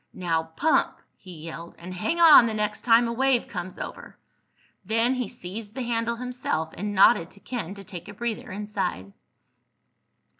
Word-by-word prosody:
"Now 165 Hz, -3 st, -1 dB
pump!" 315 Hz, -, +2 dB, 0.2 s
he 175 Hz, -5 st, -12 dB
yelled. 165 Hz, +1 st, -8 dB
"And 180 Hz, +2 st, -8 dB
hang 215 Hz, -, -2 dB
on 315 Hz, -8 st, +9 dB
the 220 Hz, -, -3 dB
next 210 Hz, 0 st, -2 dB
time 235 Hz, 0 st, +5 dB
a 230 Hz, -, -2 dB
wave 260 Hz, 0 st, +2 dB
comes 180 Hz, -1 st, -6 dB
over!" -, -, -8 dB, 0.7 s
Then 225 Hz, +5 st, +2 dB
he 250 Hz, -3 st, -2 dB
seized 205 Hz, +5 st, -8 dB
the 260 Hz, -, -3 dB
handle 235 Hz, -1 st, -1 dB
himself 245 Hz, -10 st, -3 dB
and 205 Hz, +3 st, -4 dB
nodded 190 Hz, -3 st, +5 dB
to 200 Hz, -, -17 dB
Ken 200 Hz, -5 st, -5 dB
to 200 Hz, -, -10 dB
take 175 Hz, -2 st, -9 dB
a 205 Hz, -, -8 dB
breather 235 Hz, -2 st, -4 dB
inside. 190 Hz, -, -4 dB
210 Hz, 165 wpm, -26 LUFS, 180-235 Hz, 0.7 s, on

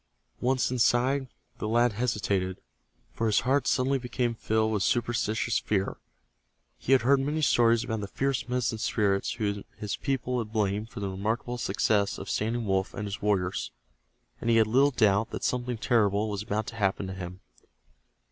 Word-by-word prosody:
Once 130 Hz, 0 st, +1 dB
inside, 130 Hz, +2 st, +2 dB, 0.3 s
the 110 Hz, -, -2 dB
lad 120 Hz, +1 st, +3 dB
hesitated, 100 Hz, -5 st, -1 dB, 0.5 s
for 115 Hz, -, -1 dB
his 105 Hz, -, +3 dB
heart 135 Hz, +1 st, +1 dB
suddenly 135 Hz, +1 st, +2 dB
became 120 Hz, -1 st, -1 dB
filled 110 Hz, -1 st, 0 dB
with 105 Hz, -, 0 dB
superstitious 115 Hz, +1 st, +1 dB
fear. 100 Hz, -2 st, -1 dB, 0.8 s
He 130 Hz, -, +1 dB
had 130 Hz, -3 st, +4 dB
heard 135 Hz, +2 st, +4 dB
many 150 Hz, +3 st, -1 dB
stories 115 Hz, -2 st, +4 dB
about 110 Hz, -2 st, -3 dB
the 100 Hz, -, -4 dB
fierce 130 Hz, +1 st, -2 dB
Medicine 125 Hz, -3 st, -1 dB
Spirits 100 Hz, -3 st, 0 dB
whom 100 Hz, -3 st, -2 dB
his 105 Hz, -2 st, -3 dB
people 125 Hz, -3 st, -1 dB
blamed 105 Hz, 0 st, -1 dB
for 105 Hz, -, -8 dB
the 100 Hz, -, -2 dB
remarkable 110 Hz, +5 st, -2 dB
success 100 Hz, -1 st, +1 dB
of 95 Hz, -, -6 dB
Standing 115 Hz, +2 st, -1 dB
Wolf 95 Hz, -1 st, 0 dB
and 105 Hz, -, -4 dB
his 100 Hz, +1 st, -5 dB
warriors, 95 Hz, -10 st, 0 dB, 0.7 s
and 115 Hz, -, -2 dB
he 115 Hz, -, +5 dB
had 110 Hz, -1 st, +5 dB
little 130 Hz, +6 st, +4 dB
doubt 110 Hz, -4 st, +2 dB
that -, -, -6 dB
something 125 Hz, -1 st, -1 dB
terrible 105 Hz, -2 st, +2 dB
was 100 Hz, -1 st, -3 dB
about 105 Hz, 0 st, -2 dB
to 110 Hz, -, -8 dB
happen 100 Hz, -1 st, 0 dB
to 95 Hz, -, -5 dB
him. 90 Hz, 0 st, -7 dB
110 Hz, 170 wpm, -28 LUFS, 100-120 Hz, 0.8 s, he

